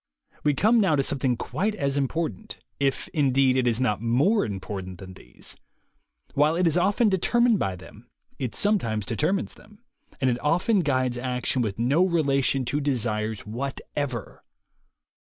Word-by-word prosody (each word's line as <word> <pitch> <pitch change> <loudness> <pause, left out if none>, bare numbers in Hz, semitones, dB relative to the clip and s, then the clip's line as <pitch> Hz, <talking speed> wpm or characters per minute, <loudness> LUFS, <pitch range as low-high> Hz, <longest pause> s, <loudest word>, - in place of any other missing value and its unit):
We 145 -1 +2
come 220 - +4
now 185 -6 +3
to 140 - +1
something 130 -3 0
quite 210 - -2
as 140 -7 -1
impor 150 +4 -1
tant, 220 0 -11 0.2
if, 135 -1 0
indeed, 135 -3 +2
it 130 -1 +2
is 120 -1 +2
not 105 -5 0
more 140 - +2
important 95 -2 -5
than 95 0 -10
these. 95 - -7 0.8
While 150 +3 +3
it 180 +1 +1
is 165 - +2
often 200 +6 +3
determined 225 +3 +3
by 95 -1 -1
them, 90 - -14 0.3
it 125 -4 -3
sometimes 115 - +1
determines 155 - -1
them, 210 +1 -19 0.4
and 130 - +1
it 120 - -3
often 180 +8 +2
guides 130 -6 0
action 125 0 -1
with 105 -5 -2
no 135 +9 +3
relation 140 -6 +1
to 140 +5 -1
desires 110 -6 -1
whatever. 130 +1 -5
135 Hz, 155 wpm, -25 LUFS, 120-170 Hz, 0.8 s, come